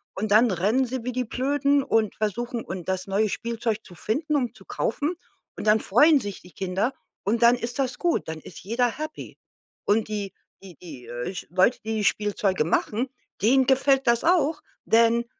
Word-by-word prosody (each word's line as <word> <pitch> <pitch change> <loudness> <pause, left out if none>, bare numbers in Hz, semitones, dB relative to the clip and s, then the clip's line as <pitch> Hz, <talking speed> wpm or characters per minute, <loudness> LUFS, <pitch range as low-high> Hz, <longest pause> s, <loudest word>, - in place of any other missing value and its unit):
Und 205 +2 -3
dann 225 +3 +6
rennen 210 +8 +1
sie 255 -1 -4
wie 250 - -2
die 250 +1 -1
Blöden 280 +3 +1
und 220 -5 +1
versuchen 235 +3 -3
und 180 0 -6
das 185 0 -1
neue 205 +2 +1
Spielzeug 230 0 -3
zu 180 - -14
finden 290 - -2
und 245 -5 -1
zu - - -16
kaufen, 340 -10 -2 0.4
und - - -6
dann 215 +1 +5
freuen 290 +10 +5
sich 205 -5 -6
die 180 - -16
Kinder 190 +6 -1 0.3
und 225 +4 0
dann 235 +1 +7
ist 240 +1 -5
das 260 -2 -1
gut. 345 -2 0
Dann 160 0 -5
ist 165 - -12
jeder 235 +6 +1
happy. 310 +1 -7 0.5
Und 215 +1 +2
die 205 -2 -4 0.3
die 185 -3 -12
die, 145 -9 -10
äh, 120 +10 -5
sch - - -6
Leute, 185 +7 +3
die 220 -1 -1
Spielzeuge 205 -3 +1
machen, 220 +9 0 0.3
denen 260 +4 +4
gefällt 270 0 +3
das 235 0 +3
auch, 325 -3 +2 0.2
denn 230 +1 +4
230 Hz, 185 wpm, -25 LUFS, 200-260 Hz, 0.5 s, dann